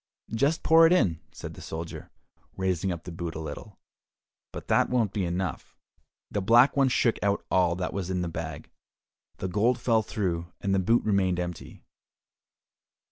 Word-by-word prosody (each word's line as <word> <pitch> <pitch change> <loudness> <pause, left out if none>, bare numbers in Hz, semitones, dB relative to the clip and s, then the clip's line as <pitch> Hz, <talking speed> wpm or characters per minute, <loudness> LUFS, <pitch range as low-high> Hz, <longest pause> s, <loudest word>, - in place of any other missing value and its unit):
"Just 140 +8 +1
pour 165 0 +7
it 170 - +4
in," 85 - +2
said - - -8
the - - -11
soldier, 80 +1 -7 0.5
raising 95 0 0
up 85 -1 -5
the 90 - -8
boot 85 0 -5
a - - -4
little, 80 +6 -8 0.7
"but - - -8
that - - +3
won't 115 -6 +1
be 100 -4 -1
enough." 85 -2 -4 0.5
The 105 - -1
Black 120 +7 +5
One 135 -2 +4
shook 120 -2 +1
out 100 0 0
all 90 -2 +3
that 90 0 -3
was 95 -2 -3
in 90 -1 -1
the - - -2
bag; 80 -2 -6 0.7
the 95 - -3
gold 110 +7 +2
fell 115 -2 +2
through, 90 -5 -3
and 100 -1 -1
the 95 - +3
boot 115 +6 +2
remained 95 -4 +1
empty. 85 -2 -6
95 Hz, 175 wpm, -27 LUFS, 85-115 Hz, 0.7 s, pour